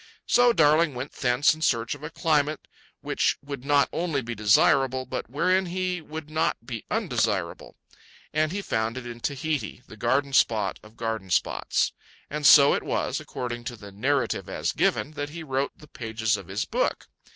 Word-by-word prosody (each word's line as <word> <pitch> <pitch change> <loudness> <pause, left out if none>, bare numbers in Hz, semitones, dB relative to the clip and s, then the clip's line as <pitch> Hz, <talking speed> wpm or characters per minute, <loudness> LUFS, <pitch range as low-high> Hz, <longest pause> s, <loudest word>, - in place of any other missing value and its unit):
So 245 0 +5
Darling 155 - +4
went 130 +3 -5
thence 125 +4 +2
in 155 - -11
search 115 -6 +1
of 145 - -10
a 150 - -4
climate 155 -3 0 0.3
which - - 0
would 140 -3 -6
not 140 0 +3
only 165 -6 -1
be 120 +1 -4
desirable, 130 +5 +3
but - - -5
wherein 185 +7 +1
he 180 0 -2
would 155 0 -8
not 155 -6 -1
be 115 -3 -6
undesirable. - - -1 0.6
And 155 0 +1
he 200 +2 -3
found 110 -3 -1
it 130 - -6
in 120 -1 -7
Tahiti, 140 0 -3
the - - -12
garden 135 +5 0
spot 110 -5 +2
of 105 +2 -17
garden 110 -4 -3
spots. 90 - +1 0.4
And 150 -1 +2
so 140 -1 +8
it - - 0
was, - - -1
according 120 -1 -5
to 120 - -4
the 100 -3 -12
narrative 135 +8 -1
as - - -1
given, 145 - 0
that 145 -1 -5
he 165 +2 -7
wrote 135 -1 -1
the 150 - -15
pages 110 -4 -1
of 100 -4 -8
his 95 +2 -2
book. - - -1
140 Hz, 180 wpm, -26 LUFS, 115-155 Hz, 0.6 s, so